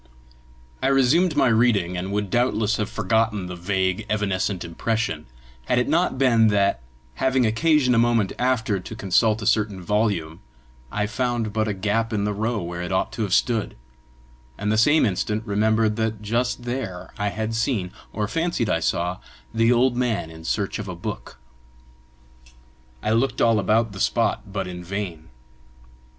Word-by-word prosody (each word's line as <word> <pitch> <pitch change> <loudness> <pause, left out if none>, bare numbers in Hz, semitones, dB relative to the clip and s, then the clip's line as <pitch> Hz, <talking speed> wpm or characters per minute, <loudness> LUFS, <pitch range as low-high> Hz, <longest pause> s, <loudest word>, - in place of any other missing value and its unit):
I - - +1
resumed 135 +6 +3
my - - +4
reading, 110 -6 +2
and 90 +2 -3
would 105 -1 -2
doubtless 115 -3 +1
have 105 -1 -2
forgotten 110 -4 0
the 90 0 -6
vague, 95 +3 -1
evanescent 100 -3 -1
impression, 85 - -2 0.4
had 125 - +1
it 125 - +2
not 165 0 +1
been 120 -4 +4
that, 100 - +2 0.4
having 130 -1 +3
occasion 130 +3 +3
a 115 - +4
moment 115 -4 +2
after 115 -5 +1
to 100 +4 -8
consult 110 +2 +2
a - - -4
certain 105 -2 +1
volume, 95 -4 -1 0.5
I 105 0 0
found 115 0 -2
but 110 0 0
a 105 - -1
gap 105 +4 0
in 105 -2 0
the 105 0 0
row 110 0 -1
where 85 +1 -5
it 90 - -4
ought 95 - 0
to 115 - -5
have 100 -4 -1
stood, 115 -4 0 0.8
and 105 +1 -1
the - - +2
same 145 +6 +5
instant 105 +2 -1
remembered 110 +1 +1
that 110 -1 -1
just 120 +3 -1
there 120 -8 -5
I 100 - 0
had 110 +2 -3
seen, 110 -5 -1 0.2
or 105 -1 -2
fancied 165 -5 -1
I 85 - +2
saw, 85 +2 -1 0.3
the 115 +1 +3
old 125 +1 +3
man 115 -9 -1
in 80 0 -12
search 100 +3 -1
of 105 - -5
a 90 - -5
book. 85 - -7 1.7
I 110 - 0
looked 115 +5 +1
all 115 -2 +4
about 110 +2 +2
the 95 - -9
spot 100 - 0
but 95 -2 -3
in 90 -1 -7
vain. 90 -4 -5
110 Hz, 170 wpm, -23 LUFS, 100-115 Hz, 1.7 s, same